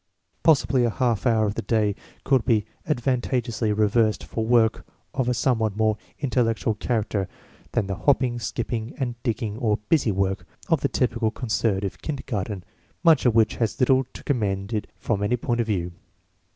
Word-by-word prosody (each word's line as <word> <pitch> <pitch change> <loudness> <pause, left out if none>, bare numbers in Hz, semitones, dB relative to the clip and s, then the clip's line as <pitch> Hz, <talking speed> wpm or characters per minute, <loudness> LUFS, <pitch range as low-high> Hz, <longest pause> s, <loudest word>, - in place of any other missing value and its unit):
Possibly 140 -5 +4
a 120 - +3
half 120 0 0
hour 110 -2 +3
of 100 - -1
the - - -3
day 110 -3 +1 0.3
could 135 -4 +3
be 110 -5 +2 0.2
advanta 125 -3 +1
geously 115 -2 -2
reserved 110 +1 +2
for 110 - -3
work 110 -1 +3 0.3
of 125 -2 0
a - - +2
somewhat 110 -5 +1
more 110 -1 +2 0.2
intel 125 -3 +1
lectual 110 -1 -2
character 105 -5 -1 0.5
than 115 - +1
the 100 - -3
hopping, 125 +1 +1
skipping, 115 +1 -3
sand 125 -3 -2
digging 115 -3 -2
or 105 -3 +1
"busy 150 -9 +3
work" 95 0 -1 0.2
of 165 -4 +3
the - - +1
typical 115 -3 +1
conservative 105 -4 -1
kindergarten, 110 - -4 0.4
much 160 -7 +5
of 115 - +2
which 110 -1 +3
has 115 +3 -1
little 130 0 +4
to - - -10
commend 100 -5 -1
it 105 - -2
from 105 -4 -1
any 105 +4 +1
point 120 0 0
of 115 - -3
view. 90 -5 -1
115 Hz, 175 wpm, -24 LUFS, 105-125 Hz, 0.5 s, much